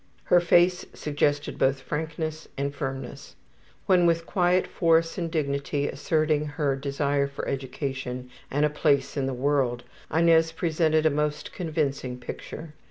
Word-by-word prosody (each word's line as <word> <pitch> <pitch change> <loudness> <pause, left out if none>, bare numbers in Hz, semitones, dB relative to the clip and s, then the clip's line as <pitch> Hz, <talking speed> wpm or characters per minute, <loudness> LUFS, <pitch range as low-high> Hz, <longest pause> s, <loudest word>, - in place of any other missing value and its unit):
Her 180 - +5
face 175 +1 +4
suggested 145 -1 -1
both 135 0 +2
frankness 155 +2 -4
and 140 +1 -2
firmness. 135 -2 -6 0.5
When 180 -2 +4
with 165 0 +1
quiet 180 -1 +2
force 165 -1 +2
and 170 -1 -2
dignity 140 -2 -1
asserting 155 0 +1
her 145 -2 -1
desire 140 +1 0
for 140 - -6
education 130 -2 -4 0.2
and 145 +2 +2
a - - +2
place 145 -3 +1
in 135 -2 0
the 135 - -2
world, 130 -2 0 0.3
Inez 165 0 +4
presented 160 -1 +1
a 155 - +5
most 150 +1 -2
convincing 145 -7 -2
picture. 150 +5 -8
150 Hz, 140 wpm, -26 LUFS, 140-160 Hz, 0.5 s, Her